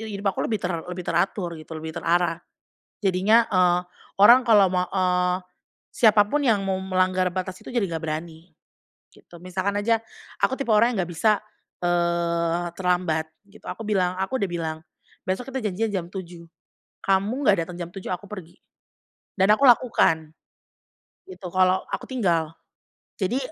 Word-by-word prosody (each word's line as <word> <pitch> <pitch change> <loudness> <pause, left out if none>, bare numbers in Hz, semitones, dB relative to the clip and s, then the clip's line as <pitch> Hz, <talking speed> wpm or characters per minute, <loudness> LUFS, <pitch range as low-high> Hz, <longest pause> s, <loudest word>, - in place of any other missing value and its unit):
hidup 200 0 0
aku - - -7
lebih 220 -2 -1
ter 180 - 0 0.2
lebih 180 0 -6
teratur 180 0 -1
gitu, 155 +1 -14
lebih 160 0 -6
terarah. 170 0 +1 0.6
Jadinya, 195 +5 +4
eee, 180 -2 +4 0.4
orang 240 +5 +9
kalau 205 -4 +6
mau 180 -1 0
eee, 180 -1 +1 0.5
siapapun 220 +5 +3
yang 205 -3 +2
mau 190 -1 -1
melanggar 185 -1 +1
batas 185 0 -4
itu - - -16
jadi 240 -4 +1
nggak 165 -1 -4
berani, 160 +2 -6 0.6
gitu. 170 - -16
Misalkan 185 +3 -2
aja, 225 +2 +1 0.4
aku 265 - +2
tipe 255 -4 -1
orang 230 +3 +4
yang 190 - +1
nggak 175 - -9
bisa, 215 +6 +3 0.5
eee, 170 -1 0
terlambat 175 -4 0 0.2
gitu. 205 +2 -19
Aku 225 - -6
bilang 185 -4 +1
aku 225 +8 -1
udah 200 - 0
bilang, 160 -2 -3 0.5
"Besok 215 +8 -3
kita 265 - -2
janjian 220 +5 -1
jam 185 -3 -2
7.00, 175 -3 -9 0.6
kamu 205 +8 +1
nggak 200 - +5
datang 175 -1 -8
jam 175 -1 -6
7.00 195 - -7
aku 180 +2 -4
pergi," 190 -5 -10 0.8
dan 190 +1 +3
aku 245 +6 +3
lakukan. 225 - +4 1.0
Gitu, 370 - -9
kalau 185 +1 +3
aku - - -4
tinggal. 175 - 0 0.7
Jadi, 230 +8 0
185 Hz, 155 wpm, -24 LUFS, 175-205 Hz, 1.0 s, orang